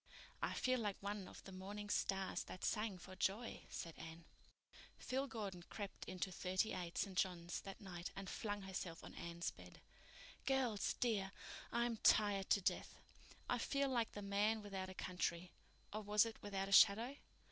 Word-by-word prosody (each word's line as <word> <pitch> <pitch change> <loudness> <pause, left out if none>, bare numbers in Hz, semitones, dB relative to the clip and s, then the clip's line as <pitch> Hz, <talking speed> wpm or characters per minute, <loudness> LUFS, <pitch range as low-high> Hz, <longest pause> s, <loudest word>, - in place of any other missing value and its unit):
"I - - +1
feel 255 0 +2
like 205 -3 -1
one 200 -1 -2
of - - -11
the 195 - -9
morning 200 +2 -5
stars 195 -2 +1
that 185 - -5
sang 210 -3 +1
for 185 +1 -10
joy," 210 +6 0
said 165 - -4
Anne. 165 +1 -8 0.7
Phil 265 +2 -1
Gordon 205 -7 -4
crept 205 -3 -5
into 185 0 -2
Thirty 185 +4 +1
eight, 175 -2 -4
St. 195 -2 0
John's, 175 -2 0
that 195 - -7
night 180 -4 -5
and 195 0 -5
flung 205 0 -2
herself 185 -3 -4
on - - -8
Anne's 170 0 -3
bed. - - -13 0.7
"Girls, 255 -6 +2
dear, 205 -5 +2 0.4
I'm 235 -1 +1
tired 205 -3 +5
to 200 - +5
death. - - 0 0.5
I - - +2
feel 275 0 +2
like 235 -3 +1
the 205 - -5
man 210 +2 +2
without 190 -2 -3
a 185 - -8
country—or 180 +4 -3
was 210 +1 +5
it 225 -1 -6
without 195 -1 -2
a - - -5
shadow? 225 +7 +7
200 Hz, 170 wpm, -41 LUFS, 185-215 Hz, 0.7 s, shadow